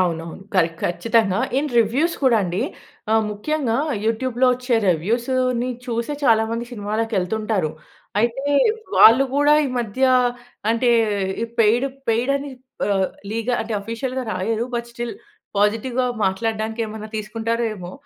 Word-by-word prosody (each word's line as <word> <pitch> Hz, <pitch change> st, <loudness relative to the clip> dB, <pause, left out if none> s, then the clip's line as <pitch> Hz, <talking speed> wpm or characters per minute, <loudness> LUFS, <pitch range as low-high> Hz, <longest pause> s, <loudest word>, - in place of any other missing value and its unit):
అవునవును. 170 Hz, 0 st, -2 dB
కరె 170 Hz, -3 st, +4 dB
ఖచ్చితంగా. 215 Hz, +1 st, +1 dB, 0.2 s
In 295 Hz, -1 st, -1 dB
reviews 265 Hz, +10 st, +2 dB
కూడా 240 Hz, -3 st, +5 dB
అండి, 180 Hz, +3 st, -2 dB, 0.5 s
ఆ! -, -, +5 dB, 0.2 s
ముఖ్యంగా 235 Hz, +2 st, -1 dB, 0.3 s
యూట్యూబ్‌లో 245 Hz, +3 st, +1 dB
వచ్చే 250 Hz, -1 st, -1 dB
రెవ్యూస్‌ని 240 Hz, +8 st, +1 dB, 0.2 s
చూసే 235 Hz, +4 st, -2 dB
చాలా 220 Hz, -3 st, +5 dB
మంది 230 Hz, +1 st, -2 dB
సినిమాలకి 215 Hz, +1 st, -2 dB
ఎళ్తుంటారు. 210 Hz, -4 st, -1 dB, 0.5 s
అయితే 240 Hz, +4 st, 0 dB, 0.5 s
వాళ్ళు 245 Hz, +5 st, +8 dB
కూడా 290 Hz, +1 st, +5 dB
ఈ -, -, -2 dB
మధ్య 235 Hz, +2 st, -3 dB, 0.7 s
అంటే, 240 Hz, +1 st, +2 dB, 0.7 s
పెయిడ్ 230 Hz, +4 st, +4 dB, 0.2 s
పెయిడ్ 235 Hz, +4 st, +2 dB
అని 280 Hz, 0 st, -6 dB, 0.4 s
ఆహ్, 195 Hz, -2 st, +2 dB, 0.2 s
లీగ 230 Hz, +2 st, -3 dB
అంటే, 225 Hz, 0 st, -4 dB
ఆఫీషియల్‌గా 250 Hz, +4 st, -4 dB
రాయరు. 220 Hz, +5 st, -1 dB
బట్ 235 Hz, 0 st, -3 dB
స్టిల్ 240 Hz, +5 st, -5 dB, 0.4 s
పాజిటివ్‌గా 230 Hz, +5 st, +1 dB, 0.2 s
మాట్లాడడానికి 220 Hz, +3 st, -1 dB
ఏమన్నా 215 Hz, 0 st, -7 dB
తీసుకుంటారో 225 Hz, +2 st, -2 dB
ఏమో. 180 Hz, -2 st, -8 dB
230 Hz, 125 wpm, -21 LUFS, 210-245 Hz, 0.7 s, వాళ్ళు